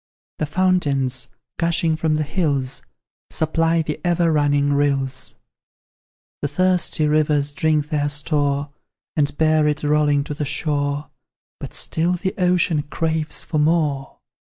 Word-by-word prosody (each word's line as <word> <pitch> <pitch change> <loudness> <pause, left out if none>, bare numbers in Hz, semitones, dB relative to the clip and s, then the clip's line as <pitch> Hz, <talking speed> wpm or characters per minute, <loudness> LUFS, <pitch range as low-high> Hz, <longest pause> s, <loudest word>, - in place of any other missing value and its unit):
The 155 - -1
fountains, 145 -7 +1 0.3
gushing 165 -1 +2
from 155 -1 0
the 155 - 0
hills, 140 -5 -1 0.5
Supply 165 +1 +1
the 150 -1 -5
ever 175 -1 +2
running 145 -1 +2
rills; 140 -2 0 1.1
The - - 0
thirsty 180 0 +1
rivers 150 -1 +1
drink 155 -2 +1
their 145 -2 0
store, 145 -1 0 0.4
And 145 -1 0
bear 155 -1 +3
it 150 +1 -1
rolling 145 -1 +2
to 150 - -5
the 150 - -3
shore, 145 0 -2 0.5
But - - -6
still 170 +3 +1
the 185 +1 -2
ocean 180 -4 +2
craves 160 -1 -1
for 155 - -2
more. 150 -3 0
150 Hz, 125 wpm, -21 LUFS, 145-160 Hz, 1.1 s, bear